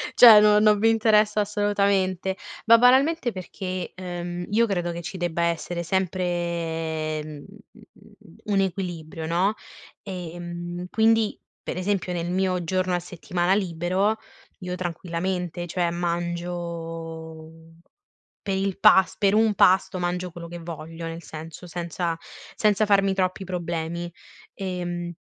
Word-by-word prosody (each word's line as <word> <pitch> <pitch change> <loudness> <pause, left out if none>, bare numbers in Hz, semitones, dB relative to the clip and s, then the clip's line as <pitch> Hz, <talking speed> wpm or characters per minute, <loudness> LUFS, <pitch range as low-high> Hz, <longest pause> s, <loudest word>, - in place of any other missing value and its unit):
cioè 230 -4 +10
non 210 0 +5
non 210 -1 +5
mi 225 +2 +4
interessa 215 -1 +3
assolutamente, 200 -2 0 0.3
ma 230 0 +8
banalmente 260 +2 +4
perché, 185 -1 -5
uhm, 175 -1 -5
io 230 +3 +4
credo 175 -4 -1
che 170 - -5
ci 190 +2 -6
debba 175 -1 -1
essere 170 +1 -1
sempre, 170 -4 -2
mhmm, 150 -2 -9 1.0
un 200 -2 +1
equilibrio 170 -4 -4
no, 180 +5 +2 0.5
ehm, 175 -1 -6
quindi, 225 0 +2 0.2
per - - -5
esempio, 185 -1 -1
nel 175 0 -2
mio 185 -1 0
giorno 185 +1 0
a 175 - +1
settimana 175 +1 -1
libero, 185 +2 +1 0.4
io 180 -1 -4
tranquillamente, 175 0 -3
cioè, 175 0 0
mangio 170 -2 -4 0.9
per 195 -1 -1
il 195 0 -2
pas 195 -3 +6
per 200 -1 +3
un 220 -1 +3
pasto, 185 +1 +4
mangio 180 +1 -2
quello 170 0 -8
che 175 0 -8
voglio, 165 0 -7
nel 165 +1 -7
senso, 160 +2 -9
senza 170 0 -3 0.4
senza 210 0 +2
farmi 195 -1 +3
troppi 185 0 -1
problemi, 170 -1 -4 0.4
ehm, 175 -2 -4
180 Hz, 125 wpm, -25 LUFS, 170-195 Hz, 1.0 s, cioè